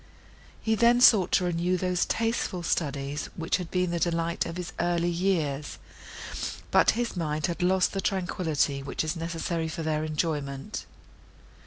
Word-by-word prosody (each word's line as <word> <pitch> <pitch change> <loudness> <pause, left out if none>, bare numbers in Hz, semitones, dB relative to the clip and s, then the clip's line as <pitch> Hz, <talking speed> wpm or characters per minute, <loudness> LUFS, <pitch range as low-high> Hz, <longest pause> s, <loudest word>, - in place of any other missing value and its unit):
He 220 - 0
then 235 +2 +4
sought 215 -7 +6
to 185 - +4
renew 175 +1 +1
those 180 0 0
tasteful 225 -6 -1
studies, 145 -3 -2
which 165 0 0
had 180 -3 -6
been 180 -1 0
the 170 - -1
delight 170 0 0
of 165 +1 -6
his 180 -1 -5
early 175 0 +1
years; 165 -6 -1 0.9
but - - +5
his 240 -3 -1
mind 155 -3 -1
had 170 +1 -3
lost 185 +1 +3
the 195 - -1
tranquillity, 165 -7 0
which 135 - -3
is 155 +2 -2
necessary 165 0 -2
for 160 +1 -4
their 155 -1 0
enjoyment. 150 -3 -3
170 Hz, 155 wpm, -27 LUFS, 155-180 Hz, 0.9 s, sought